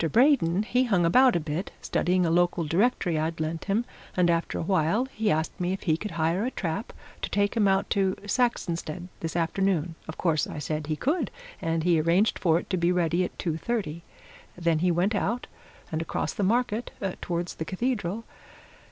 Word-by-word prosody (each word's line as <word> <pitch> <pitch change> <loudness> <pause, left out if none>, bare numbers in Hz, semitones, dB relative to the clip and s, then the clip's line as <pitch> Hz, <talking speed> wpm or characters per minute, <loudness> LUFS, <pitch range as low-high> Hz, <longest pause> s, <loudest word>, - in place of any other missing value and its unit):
Braden, 225 - +4
he 250 +3 +2
hung 190 -8 +2
about 250 +8 +5
a - - +3
bit, 160 +4 -3
studying 180 0 +1
a 165 - +1
local 175 0 +2
directory 175 0 +1
I'd 160 +1 -2
lent 160 +1 -3
him, 210 +4 +1 0.3
and 175 -1 +4
after 170 0 -1
a - - -2
while 185 +6 +2
he 220 -5 -2
asked 160 +3 0
me 180 +1 0
if 195 - -5
he 160 -4 +2
could 210 +6 -5
hire 165 +5 +1
a 250 - 0
trap 200 0 -3 0.3
to - - -2
take 205 +2 +1
him 215 -3 +3
out 195 +1 +2
to 190 -1 +2
Saxonsteade 180 -7 -1
this 165 0 -4
afternoon. 175 -1 +1
Of 155 - -7
course, 160 -5 +1
I - - -7
said 150 0 -3
he 155 - 0
could, 295 - 0 0.3
and 165 0 0
he 170 -2 +3
arranged 175 +7 +2
for 165 -3 +3
it - - -4
to 185 - +1
be 170 0 +2
ready 175 0 +2
at - - -5
two 165 -3 -2
thirty. 175 -6 -2 0.6
Then 170 -2 +1
he 180 +2 +2
went 175 +5 +2
out, 230 +4 -1 0.5
and 160 0 -1
across 165 - -2
the - - -3
market 230 +2 +1 0.3
towards 175 0 -2
the 160 - -5
Cathedral. 210 0 -2
175 Hz, 195 wpm, -27 LUFS, 165-205 Hz, 0.6 s, about